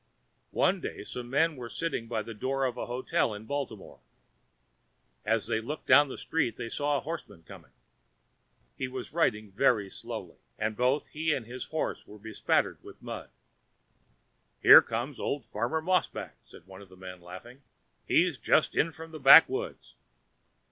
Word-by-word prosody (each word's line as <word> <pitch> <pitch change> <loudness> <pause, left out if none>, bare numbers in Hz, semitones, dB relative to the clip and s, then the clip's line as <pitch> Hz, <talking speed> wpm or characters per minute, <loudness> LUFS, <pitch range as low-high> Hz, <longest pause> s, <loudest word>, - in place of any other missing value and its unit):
One - - +2
day - - -6
some 120 -1 -7
men 160 +4 +2
were 120 -3 -8
sitting 120 -1 -3
by 115 -2 -2
the 115 - -8
door 135 +5 -1
of 125 -2 -2
a - - -5
hotel 120 -2 -1
in 105 +1 -10
Baltimore. 125 -6 -5 1.2
As 110 +1 0
they 110 - -1
looked 145 +7 -6
down 145 -1 +6
the - - -7
street 135 -9 -1
they 115 - -5
saw 145 +2 0
a - - -4
horseman 155 - -7
coming. - - -14 1.1
He 130 - -3
was 130 +1 -7
riding 110 - 0
very 105 -2 +2
slowly, - - -8 0.2
and 110 0 -2
both 125 +5 0
he 155 0 0
and 120 - -5
his 125 +2 -7
horse 160 - -4
were 105 - -12
bespattered 110 +1 -1
with - - -13
mud. - - -8 1.3
"There - - +11
comes 120 +5 -4
old 140 -5 -3
Farmer 120 +9 -2
Mossback," 180 0 -1
said - - -16
one 95 0 -13
of 100 - -15
the 95 - -16
men, 90 -1 -10
laughing. 95 +10 -12 0.5
"He's - - +2
just - - +2
in 165 - +1
from 160 +1 -11
the 155 - -8
backwoods." 165 - +5
125 Hz, 165 wpm, -29 LUFS, 110-145 Hz, 1.3 s, There